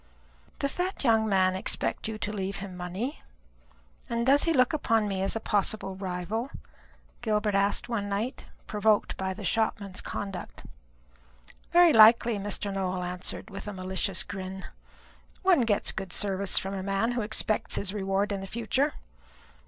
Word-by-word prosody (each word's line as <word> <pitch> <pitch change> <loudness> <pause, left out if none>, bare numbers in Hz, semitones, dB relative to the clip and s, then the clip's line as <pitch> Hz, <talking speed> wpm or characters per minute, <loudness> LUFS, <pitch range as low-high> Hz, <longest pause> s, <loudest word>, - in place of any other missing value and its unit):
"Does 280 - +1
that 365 -1 -1
young 225 -3 +3
man 185 -1 +3
expect 190 - -1
you 220 -1 -4
to 210 0 -3
leave 195 -1 -3
him 195 -2 -7
money? 185 - -4 0.9
and 235 0 -1
does 280 +2 +5
he 335 - +2
look 255 -3 +3
upon 225 -8 +1
me 195 -2 -2
as 195 - 0
a - - 0
possible 205 -2 0
rival?" 190 +6 -3 0.7
Gilbert 210 -2 0
asked 200 +4 +1
one 210 -4 -2
night, 220 +7 -3 0.2
provoked 210 0 +1
by 190 0 -3
the 205 - -7
shopman's 200 -1 -1
conduct. 195 -3 -6 1.1
"Very 345 -2 +6
likely," 225 0 +7
Mr. 200 0 -2
Nowell 185 -1 -2
answered, 180 +1 -3
with 195 +2 -7
a 210 - -4
malicious 185 0 -1
grin. 190 0 -6 0.8
"One 370 -7 +5
gets 220 -4 +1
good 190 -3 -6
service 195 0 +1
from 195 +1 0
a 195 - -3
man 195 +4 0
who 240 -1 -1
expects 215 0 0
his 195 -1 -2
reward 195 0 0
in 200 -1 -2
the 195 - -6
future. 235 +7 0
205 Hz, 160 wpm, -28 LUFS, 190-225 Hz, 1.1 s, likely